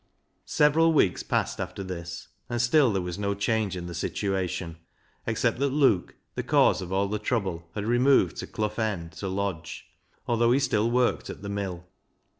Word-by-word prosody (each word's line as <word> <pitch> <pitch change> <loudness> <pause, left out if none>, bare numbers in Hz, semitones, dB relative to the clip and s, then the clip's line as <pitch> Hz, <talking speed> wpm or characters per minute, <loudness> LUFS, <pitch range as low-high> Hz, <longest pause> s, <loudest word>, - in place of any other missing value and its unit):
Several 160 +3 +4
weeks 95 - +3
passed - - -1
after 100 - -5
this, 85 -2 -7 0.2
and 120 0 -2
still 120 +2 +4
there 95 -2 -1
was 90 +1 -5
no 100 -1 -1
change 100 -1 0
in 90 - -5
the 85 - -6
situation, 90 -1 -2 0.5
except - - 0
that 140 0 +2
Luke, 135 -9 +2 0.2
the - - -2
cause - - +3
of 90 0 -7
all 100 +1 +1
the 105 +1 -2
trouble, 95 -7 -2
had 105 - -3
removed 120 -5 +3
to - - -5
Clough 105 +1 -3
End 90 -7 -3
to 85 +5 -6
lodge, 95 -4 -3 0.4
although 120 0 +3
he 135 - +3
still 115 -5 +1
worked 125 +1 +1
at - - -8
the 100 - -5
mill. 95 -4 -4
100 Hz, 180 wpm, -27 LUFS, 90-120 Hz, 0.5 s, Several